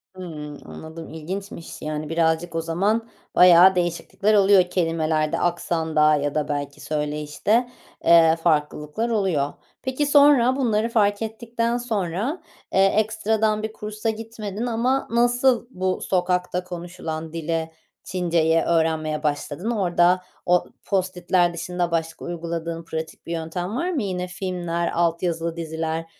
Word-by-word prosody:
Hımm, 150 -5 -7
anladım, 160 +1 -9
ilginçmiş, 175 +2 -7
yani, 155 0 -4
birazcık 165 +1 0
o 165 - 0
zaman 205 +8 0 0.3
bayağı 180 +1 +8
değişiklikler 180 +4 0
oluyor 195 -2 +6
kelimelerde, 165 -2 0
aksanda 160 -3 +2
ya 145 0 -2
da 150 - 0
belki 145 -1 -4
söyleyişte, 150 +10 -1 0.4
eee, 165 -1 +7
farklılıklar 150 +6 0
oluyor. 185 -10 0 0.3
Peki, 260 +3 -1
sonra 280 -3 +5
bunları 230 -4 +1
fark 205 -2 +2
ettikten 230 +1 -2
sonra, 220 - -2 0.3
eee, 195 0 +5
ekstradan 215 +1 +1
bir 220 0 -4
kursa 215 +1 -4
gitmedin 220 -1 -5
ama 245 +3 0
nasıl 240 +1 +3
bu 185 -4 -2
sokakta 180 -1 0
konuşulan 170 -3 -6
dili, 165 0 -2 0.3
Çinceyi 165 -3 +1
öğrenmeye 160 -2 0
başladın? 150 +8 -2
Orada 180 -3 +3 0.2
o 180 0 +3 0.2
post-it'ler 180 -2 +1
dışında 175 +1 -2
başka 165 -1 -2
uyguladığın 170 -1 -4
pratik 160 -1 -6
bir 170 - -5
yöntem 170 +4 -3
var 340 +8 -1
mı? 290 -10 -1
Yine 180 -2 -3
filmler, 175 -2 -3
alt 170 0 +1
yazılı 165 -1 -1
diziler, 160 0 -3
175 Hz, 125 wpm, -23 LUFS, 160-215 Hz, 0.4 s, bayağı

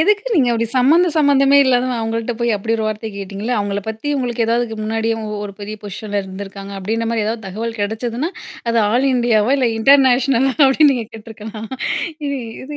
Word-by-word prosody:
எதுக்கு 415 +6 +2
நீங்க 270 -9 +3
அப்படி 230 0 0
சம்மந்தம் 325 +6 +4
சம்மந்தமே 280 -2 +4
இல்லாத 250 -1 +2
அவங்கள்ட்ட 225 +1 -2
போய் 235 -2 +1
அப்படி 225 +3 -1
ஒரு 220 - -2
வார்த்தை 215 +1 -3
கேட்டீங்களா? 200 +4 -4
அவங்களை 200 0 -2
பத்தி 220 +6 -5
உங்களுக்கு 240 -2 -1
ஏதாவது 230 -1 0
முன்னாடியே 225 +1 -1
இவங்க 215 -1 -5
ஒரு 200 - -10
பெரிய 210 +1 -6
பொசிஷன்ல 205 0 -4
இருந்திருக்காங்க 195 +1 -8
அப்படின்ற 225 +4 -2
மாரி 225 -2 0
ஏதாவது 220 -2 -3
தகவல் 225 +3 -5
கிடைச்சதுன்னா 230 - -2 0.4
அது, 230 - +2
ஆல் 260 +3 +2
இண்டியாவா 240 -1 +2
இல்ல 255 -3 +2
இன்டர்நேஷனலா 265 0 +4
அப்படின்னு 280 +2 +5
நீங்க 230 -3 -3
கேட்டுருக்கலாம் 220 0 -9 0.6
இது 280 -1 -2 0.3
இது 295 +2 -7
230 Hz, 175 wpm, -18 LUFS, 215-260 Hz, 0.6 s, அப்படின்னு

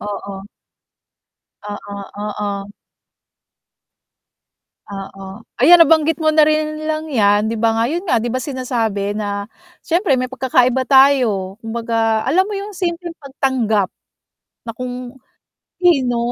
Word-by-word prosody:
Oo. 200 -1 -7 1.2
Oo, 205 -1 -7 0.3
oo. 205 -1 -4 2.2
Oo, 195 +1 -9 0.2
ayan 335 +6 +8
nabanggit 315 0 +3
mo 315 -1 +1
na 305 -1 +5
rin 310 0 0
lang 310 0 -3
yan 205 -4 +3
'di 225 - -3
ba 225 0 +2
nga, 225 - +1
'yun 350 +3 -3
nga 235 -6 +2
'di 240 - -2
ba 255 - -1
sinasabi 235 -7 -2
na 205 -1 -3 0.4
siyempre 340 -4 +1
may 255 0 -3
pagkakaiba 260 -1 +1
tayo. 245 -8 +3
Kumbaga 225 -1 -1
alam 370 +8 +2
mo 420 - -4
yung 400 +1 -5
simpleng 350 -2 -3
pagtanggap, 260 -8 -1 0.7
na 230 - -5
kung, 250 +1 -6 0.7
sino 270 -10 +2
250 Hz, 120 wpm, -18 LUFS, 210-305 Hz, 2.2 s, ayan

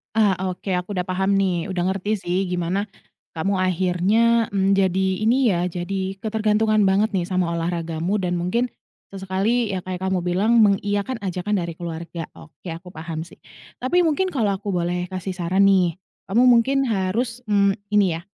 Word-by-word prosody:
Ah, 215 -3 +4 0.2
oke, 185 +1 -4
aku 180 +2 -3
udah 180 - -1
paham 190 +2 +1
nih, 185 -2 0
udah 180 -2 -1
ngerti 205 +3 -1
sih, 180 -1 -2
gimana 180 +4 -1 0.5
kamu 190 +3 0
akhirnya, 190 +6 +2
mmm, 195 0 +2
jadi, 190 -1 +2
ini 235 0 +3
ya, 175 - 0
jadi 190 +2 -3
ketergantungan 215 0 +1
banget 200 +3 +2
nih, 180 -2 -1
sama 180 -2 0
olahragamu, 170 +2 -2
dan 180 -2 -1
mungkin 185 +8 -1 0.4
sesekali 195 +5 0
yang, 185 -2 -4
kayak, 185 -1 -5
kamu 190 -2 -1
bilang 200 +7 +2
mengiyakan 205 +4 0
ajakan 190 +1 -1
dari 170 -1 -5
keluarga, 170 -1 -6
oke, 160 - -17
aku 170 +1 -7
paham 160 -2 -6
sih. 170 - -11 0.4
Tapi, 305 +9 +2
mungkin 355 +3 +1
kalau 210 -7 +1
aku 200 0 -4
boleh 175 0 -1
kasih 185 +1 -4
saran 185 +3 +3
nih, 180 -4 +3 0.3
kamu 215 +6 +2
mungkin 245 +3 +4
harus, 230 +5 -1
mmm, 200 -1 +2 0.2
ini 190 -5 +3
ya, - - -9
190 Hz, 165 wpm, -22 LUFS, 180-210 Hz, 0.5 s, Ah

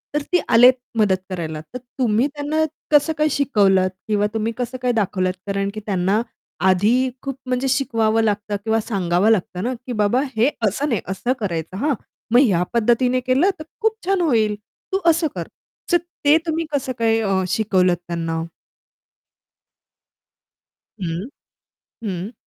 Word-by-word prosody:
तर 295 - +2
ती 355 - +4
आलेत 245 +3 +7 0.3
मदत 200 -3 +3
करायला, 160 -4 -4
तर 250 - -3 0.2
तुम्ही 235 +2 +2
त्यांना 295 +2 -1 0.3
कसं 300 +2 +4
काय 305 0 +3
शिकवलत 195 -10 +3 0.2
किंवा 210 -1 +2
तुम्ही 225 +1 -1
कसं 250 +1 -3
काय 250 -1 +1
दाखवलत? 185 -2 -1
कारण 200 0 -1
की 215 - -5
त्यांना 195 +2 +1 0.5
आधी 225 +8 +3
खूप 275 -2 -4
म्हणजे 255 +1 -1
शिकवावं 225 -5 +1
लागतं 205 -1 -1
किंवा 225 0 +2
सांगावं 190 -2 +1
लागतं 185 -2 0
ना 250 - -1
की, 250 - -6
"बाबा, 215 +3 +2 0.2
हे 235 +6 +4 0.2
असं 275 +9 -1
नाही 225 - 0
असं 195 +7 -1
करायचं, 175 -2 -3
हां. 285 +5 +1 0.4
मग 245 - +6
ह्या 185 -9 +3
पद्धतीने 240 +2 +2
केलं 260 +9 +2
तर 310 - -6 0.2
खूप 440 0 +2
छान 385 -1 +1
होईल. 220 -10 +2 0.4
तू 385 - +1
असं 325 0 +3
कर." - - -4 0.4
तर 345 - +6 0.3
ते 295 +2 +7
तुम्ही 325 0 -1
कसं 270 -3 -1
काय 225 -1 +3
अ, 195 -3 +1
शिकवलत 185 -3 +2
त्यांना? 165 -1 -2 2.6
हं. 175 +7 -3 0.8
हं. 195 +1 -4
225 Hz, 150 wpm, -21 LUFS, 195-260 Hz, 2.6 s, आलेत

